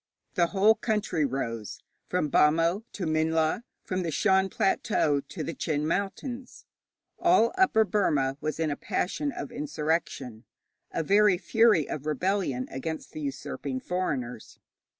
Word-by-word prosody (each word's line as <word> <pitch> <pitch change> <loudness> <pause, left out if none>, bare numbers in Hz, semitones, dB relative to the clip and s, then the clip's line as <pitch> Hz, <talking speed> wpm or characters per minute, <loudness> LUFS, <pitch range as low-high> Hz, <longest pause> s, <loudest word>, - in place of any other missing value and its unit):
The 170 -1 +3
whole 205 +4 +4
country 210 -9 0
rose, 115 -5 -4 0.3
from 180 -4 0
Bhamo 165 +6 +3
to 190 - -4
Minhla, 160 +3 +1 0.2
from 185 0 -2
the 170 - -2
Shan 190 +4 +2
Plateau 160 -7 +1
to - - -7
the 165 - -4
Chin 150 0 -1
Mountains. 240 - -4 0.5
All 350 -7 +4
Upper 375 -13 +4
Burma 150 -10 +1
was 155 +1 -3
in 160 -2 +1
a - - -1
passion 285 - -2
of 145 - -6
insurrection, 150 -6 -2 0.4
a 165 - -2
very 200 +1 +4
fury 220 -5 +3
of 150 0 -5
rebellion 155 -4 0
against 160 +4 -5
the 155 - -7
usurping 135 -1 -4
foreigners. 130 -10 -3
165 Hz, 135 wpm, -28 LUFS, 145-200 Hz, 0.5 s, whole